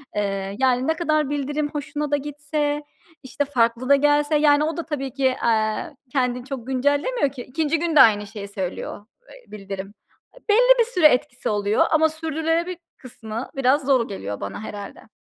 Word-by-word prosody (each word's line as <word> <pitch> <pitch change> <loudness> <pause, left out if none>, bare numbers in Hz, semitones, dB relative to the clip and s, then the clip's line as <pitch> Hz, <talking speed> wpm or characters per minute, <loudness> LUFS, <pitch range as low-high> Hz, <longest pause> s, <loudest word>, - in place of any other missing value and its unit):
Eee, 195 -1 -2
yani, 255 0 +2
ne 320 - +2
kadar 310 -3 0
bildirim 290 +1 -2
hoşuma 295 0 -4
da 290 - +3
gitse, 295 +1 -3 0.4
işte, 265 +2 -2
farklı 240 -2 0
da 280 - +8
gelse, 295 +2 +2
yani, 295 0 +4
o 320 +2 -2
da 335 - -4
tabii 275 -5 -4
ki, 275 -1 -1 0.2
eee, 225 +7 0 0.2
kendini 250 -2 0
çok 260 -3 -7
güncellemiyor 285 - +1
ki 265 - -8
2'nci 310 +3 -1
gün 335 -1 -1
de 285 - +9
aynı 210 -2 +5
şeyi 200 -1 -8
söylüyor, 200 +1 -5 0.2
eee, - - -17
bildirim. 195 -1 -7 0.6
Belli - - +5
bir 470 - +5
süre 365 -10 +5
etkisi 250 -2 -1
oluyor 205 0 +2
ama 315 0 +4
sürdürülebilir 325 +2 -2 0.2
kısmı 230 -1 -7
biraz 270 +1 +2
zor 260 -4 +3
geliyor 100 - -5
bana 100 - -5
herhâlde. 205 -2 -9
280 Hz, 170 wpm, -23 LUFS, 230-305 Hz, 0.6 s, de